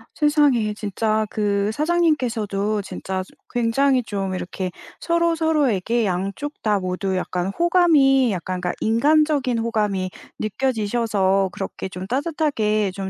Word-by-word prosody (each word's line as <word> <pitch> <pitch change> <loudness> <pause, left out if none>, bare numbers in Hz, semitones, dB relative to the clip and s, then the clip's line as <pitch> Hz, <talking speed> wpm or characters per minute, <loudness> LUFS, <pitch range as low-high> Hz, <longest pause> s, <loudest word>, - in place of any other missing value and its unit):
세상에 290 -8 +3
진짜 215 +1 -1
그 205 -1 0
사장님께서도 235 - 0
진짜 190 0 -4
좀 - - -20 0.2
굉장히 250 +2 +2
좀 195 -3 -3
이렇게 185 0 -4 0.3
서로 335 0 +1
서로에게 255 - +1
양쪽 195 +10 -3
다 210 -2 +2
모두 185 +1 -2
약간 180 0 -2
호감이 300 - +4
약간 185 0 -3
그러니까 180 -1 -1
'인간적인 280 +1 +2
호감이 210 -5 -1 0.3
느껴지셔서 215 -4 0
그렇게 190 0 -5
좀 185 +1 -7
따뜻하게 250 - 0
좀 190 0 -5
220 Hz, 300 characters per minute, -22 LUFS, 195-280 Hz, 0.3 s, 호감이